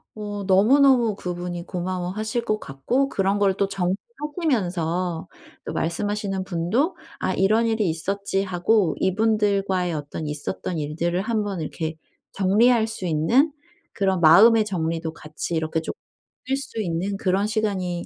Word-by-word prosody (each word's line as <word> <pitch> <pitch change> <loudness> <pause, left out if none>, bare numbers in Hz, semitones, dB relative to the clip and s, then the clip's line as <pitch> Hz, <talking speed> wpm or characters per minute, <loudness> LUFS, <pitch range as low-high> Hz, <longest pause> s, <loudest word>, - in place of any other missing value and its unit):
어 205 -1 -5
너무너무 235 +3 +5
그분이 175 -2 -5
고마워하실 185 +6 -3
것 215 0 0
같고 245 - -1
그런 195 +1 +1
걸 200 -1 +3
또 200 - +1
정리하시면서 185 - -2 0.4
또 - - -4
말씀하시는 195 +3 -2
분도 195 - 0 0.2
'아 - - 0
이런 215 +4 +3
일이 220 -4 +1
있었지.' 195 +4 -1
하고 185 0 +1
이분들과의 195 -3 +1
어떤 150 +1 -5
있었던 155 +3 -4
일들을 170 +5 -1
1 220 0 -1
번 195 -5 -4
이렇게 160 +1 -4 0.4
정리할 220 +4 +3
수 220 -4 -5
있는 180 - +3 0.4
그런 190 -2 +1
마음의 215 +8 +7
정리도 165 -4 -2
같이 155 +2 -6
이렇게 160 0 -1
쪼끔 440 - -6 0.5
느낄 270 +1 0
수 230 -5 -5
있는 185 +2 -2
그런 195 0 +1
시간이 195 -5 -1
195 Hz, 305 characters per minute, -23 LUFS, 175-215 Hz, 0.5 s, 마음의